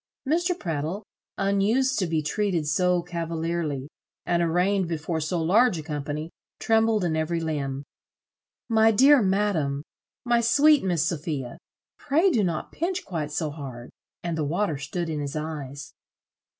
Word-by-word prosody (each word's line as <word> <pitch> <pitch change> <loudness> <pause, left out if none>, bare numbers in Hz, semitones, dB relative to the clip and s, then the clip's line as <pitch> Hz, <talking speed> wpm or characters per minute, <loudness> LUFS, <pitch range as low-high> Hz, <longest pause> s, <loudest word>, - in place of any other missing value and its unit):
Mr. 345 +4 +1
Prattle, 165 - -3 0.3
unused 210 +7 +2
to 185 - 0
be 160 -2 0
treated 180 0 0
so 180 +2 +2
cavalierly, 165 -4 -3 0.4
and 175 -1 +1
arraigned 180 +3 +2
before 160 0 -2
so 160 +3 -1
large 200 +5 +4
a 155 - -5
company, 150 +1 -4 0.3
trembled 225 -2 +2
in 165 -3 0
every 160 +2 0
limb: 140 -4 -3 0.8
"My 220 -1 +5
dear 265 +5 +6
madam, 190 -8 +1 0.4
my 240 -1 +3
sweet 290 +5 +5
Miss 175 -5 +1
Sophia, 150 -6 -3 0.4
pray 325 +7 +3
do 230 -8 +2
not 170 -4 -2
pinch 360 +3 -2
quite 155 -5 -4
so 155 0 -2
hard;" 130 -5 -8 0.3
and 170 -1 -2
the 160 - -1
water 160 0 -1
stood 170 +4 -3
in 155 -2 -3
his 140 0 -4
eyes. 145 -3 -5
170 Hz, 145 wpm, -26 LUFS, 155-210 Hz, 0.8 s, dear